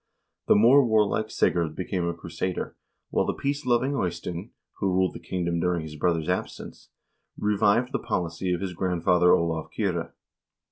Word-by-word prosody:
The - - +6
more 120 +7 +6
warlike 110 -2 +2
Sigurd 85 -7 +1
became 90 -1 -2
a 85 - -1
crusader, 85 +2 -4 0.4
while - - +1
the - - -1
peace 140 0 -3
loving 125 +3 +2
Eystein, 90 -1 -3 0.3
who 100 - 0
ruled 95 -1 +2
the - - -8
kingdom 85 -2 -2
during 90 -1 0
his 75 -1 -8
brother's 80 0 0
absence, - - -4 0.5
revived 105 +4 +2
the - - -1
policy 90 -4 -2
of 90 0 -1
his 95 -2 -3
grandfather 90 0 +2
Olav 80 -2 +1
Kyrre. - - -2
90 Hz, 155 wpm, -26 LUFS, 85-105 Hz, 0.5 s, The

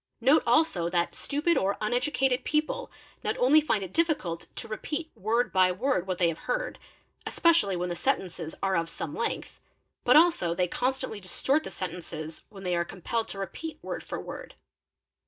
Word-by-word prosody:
Note 280 +4 +5
also 235 - +3
that 175 -1 0
stupid 305 +4 +1
or 195 +1 0
uneducated 250 +3 +1
i - - -29
people 315 +12 -1 0.3
not - - -1
only 285 +5 +6
find 220 -9 0
it 185 - -8
difficult 300 - 0
to - - -6
repeat 300 +8 -4
word 230 +4 0
by 185 -1 +5
word 190 -1 0
what 185 -1 -1
they 175 - +3
have 165 -1 -2
heard, - - -1 0.5
especially 330 - +3
when 180 0 -2
the 175 - -2
sentences 185 - -2
are 190 -1 +2
of 165 0 0
some 160 -2 -5
length, 230 - -3 0.4
but - - +5
also 305 - +5
they; 180 +1 +1
constantly 255 +1 -2
distort 265 - 0
the - - -6
sentences 165 -3 -6
when 195 -2 -11
they 180 -1 0
are 170 - +2
compelled 220 +6 -3
to - - -6
repeat 305 +11 -5
word - - -4
for - - -5
word. - - -8
215 Hz, 180 wpm, -28 LUFS, 180-290 Hz, 0.5 s, only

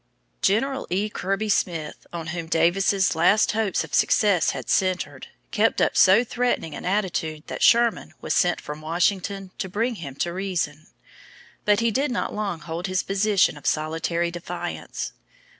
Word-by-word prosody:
General 265 +7 +1
E. 200 +4 0
Kirby 195 +2 -2
Smith, 165 -6 -1
on 170 -2 -5
whom 170 -2 -4
Davis's 190 +4 +2
last 175 +6 +4
hopes 215 -3 0
of - - -11
success 200 -5 +3
had - - -4
centered, 185 -1 0 0.2
kept - - +2
up - - +2
so 195 +5 +6
threatening 245 -9 -1
an - - -7
attitude 180 -6 -1
that - - -6
Sherman 235 -1 +4
was - - -2
sent 180 -1 +2
from 150 +1 -8
Washington 185 +4 -1
to 190 - -3
bring 230 +5 -1
him 140 -5 -7
to 170 +4 -2
reason. 170 -5 -3 0.8
But 210 +1 +3
he 230 0 +2
did 275 +6 0
not 240 - -2
long 200 -6 -3
hold 170 +3 -4
his 185 0 0
position 195 -3 +2
of 145 - -7
solitary 165 +2 0
defiance. 175 0 -5
185 Hz, 160 wpm, -24 LUFS, 170-210 Hz, 0.8 s, so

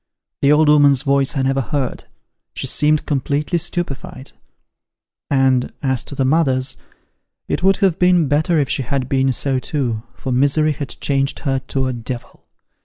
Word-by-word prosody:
The 140 - +4
old 150 +1 +4
'ooman's 145 -2 +5
voice 140 0 +1
I 135 - +1
never 135 0 +1
heard: 135 +1 -3 0.5
she - - -3
seemed 150 0 +3
completely 145 +4 -1
stupified; 140 -5 -4 1.0
and 130 -2 +2
as 130 -3 -1
to 140 - -8
the 135 - 0
mother's, 130 -3 +1 0.7
it - - -2
would 195 +1 +3
have 185 -2 0
been 180 -3 +3
better 155 +4 +1
if 145 -3 +1
she 140 - -1
had 130 +1 -2
been 135 -1 +1
so 130 +1 -1
too, 125 -6 -2
for 130 - -5
misery 145 +4 +2
had 145 -1 -5
changed 135 -1 -1
her 135 -3 0
to 135 -1 -1
a 130 - -2
devil. 120 +1 -8
140 Hz, 165 wpm, -19 LUFS, 130-150 Hz, 1.0 s, ooman's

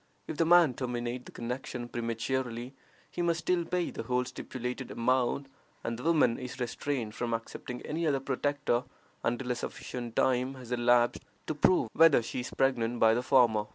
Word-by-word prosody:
If 160 - -6
the 165 - +2
man 170 -5 +6
terminate 125 0 -3
the - - -10
connection 120 0 -5
prematurely, 120 +1 -3 0.4
he 175 - -3
must 170 -1 +1
still 180 0 +1
pay 180 0 -1
the - - -5
whole 125 0 0
stipulated 125 +1 -5
amount, 130 +3 +1 0.4
and 115 - -2
the 120 - -8
woman 150 -7 +3
is 125 0 -7
restrained 125 -2 -2
from 120 0 -1
accepting 120 +2 -7
any 160 +2 -2
other 140 -2 +2
protector 135 -2 0 0.4
until 125 +2 -1
a - - +1
sufficient 120 -1 -6
time 130 +1 +2
has 125 -2 -11
elapsed 120 0 +3 0.2
to - - -2
prove 150 -4 +3
whether 160 -7 +6
she 115 - -4
is 125 - -4
pregnant 120 -3 +1
by 110 0 +6
the 120 - +1
former. 120 -5 +4
125 Hz, 175 wpm, -30 LUFS, 120-140 Hz, 0.4 s, man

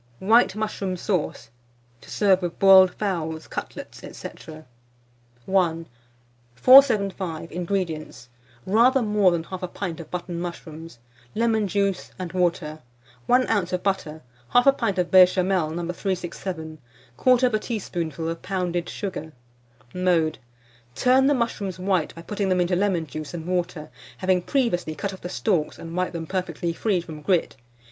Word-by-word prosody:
WHITE 220 - +4
MUSHROOM 205 -3 -3
SAUCE, 170 - -2 0.5
to - - -15
serve 195 -3 +3
with 175 -1 -4
Boiled 190 -1 +7
Fowls, 160 -6 -3
Cutlets, - - -7 0.2
&c. - - -6 0.2
I. 155 0 -10 1.9
475. 200 - +4
INGREDIENTS. 170 -7 -3 0.4
Rather 240 +6 +4
more 210 -3 +3
than 170 -2 -1
1/2 180 0 -6
pint 175 -5 -4
of 165 - -9
button 175 -1 -5
mushrooms, 165 -4 -8 0.4
lemon 220 -2 +1
juice 200 -1 -1
and 180 -3 -6
water, 170 -4 -1 0.5
1 255 +1 +4
oz. 195 -5 0
of 180 - -2
butter, 160 -6 -2 0.3
1/2 270 +3 +6
pint 210 -7 -1
of 180 -1 0
Béchamel, 185 -2 +4
No. 175 - -3
367, 175 -3 -4 0.4
1/4 250 -3 +3
teaspoonful 170 - -4
of 165 0 -4
pounded 180 -2 -2
sugar. 175 -6 -5 0.6
Mode. 175 -4 +1 0.6
Turn 255 - +4
the 290 - +3
mushrooms 205 -7 -2
white 185 -3 -1
by 165 - -10
putting 200 +1 -2
them 185 -1 +2
into 180 0 +1
lemon 185 -3 0
juice 155 +3 -7
and 165 -1 -6
water, 175 -4 -3 0.3
having 185 -1 +1
previously 175 - -1
cut 200 +2 -4
off 190 - -11
the 180 - -6
stalks 180 -5 -1
and 165 0 -8
wiped 180 0 -1
them 165 -1 -4
perfectly 175 -1 -3
free 190 0 0
from 160 -3 -10
grit. 175 +2 +1
180 Hz, 140 wpm, -24 LUFS, 165-200 Hz, 1.9 s, Boiled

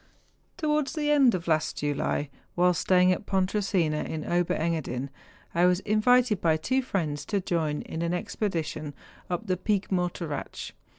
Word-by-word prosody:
Towards 300 -2 0
the 295 -2 0
end 270 -7 +5
of 175 -1 -5
last 155 -1 +1
July, 145 0 -1 0.2
while 180 0 +4
staying 180 +2 +4
at 185 +3 -2
Pontresina, 190 -4 +1
in 155 -1 -5
Ober 175 0 +1
Engadin, 150 -5 -2 0.4
I 175 +1 +4
was 180 0 +3
invited 215 0 +3
by 160 -2 +3
two 260 +11 0
friends 160 - -2
to 200 - 0
join 160 -5 -1
in 160 - -5
an 170 0 0
expedition 165 -5 -3 0.3
up 180 +5 -2
the 185 -3 0
Pic 200 +2 -1
Mor 180 -1 +2
teratsch. 160 -5 -6
180 Hz, 160 wpm, -27 LUFS, 160-205 Hz, 0.4 s, end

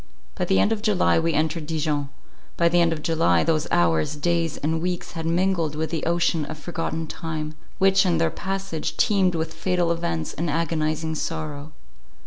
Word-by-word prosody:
By - - -2
the 95 - +3
end 210 - +3
of 220 -2 0
July 210 -6 +3
we 165 0 0
entered 155 0 0
Dijon; 150 -3 -1 0.5
by 170 0 +4
the 175 +1 +4
end 170 -1 +3
of 155 -2 -3
July 90 - +3
those 155 -2 +1
hours, 85 - +2
days, 165 +1 0
and 160 +2 -1
weeks 180 0 -3
had 165 -1 -4
mingled 170 -3 +1
with 155 0 -2
the 165 -3 -2
ocean 170 -2 +1
of 150 - -7
forgotten 165 0 -3
time, 155 -1 -5 0.2
which 195 +1 +4
in 175 -3 +2
their 165 -1 +2
passage 190 -3 -4
teemed 190 -4 +3
with 160 0 -2
fatal 180 -2 0
events 85 - -2
and 165 +2 -2
agonizing 160 0 -1
sorrow. 155 -2 -4
165 Hz, 180 wpm, -24 LUFS, 155-175 Hz, 0.5 s, by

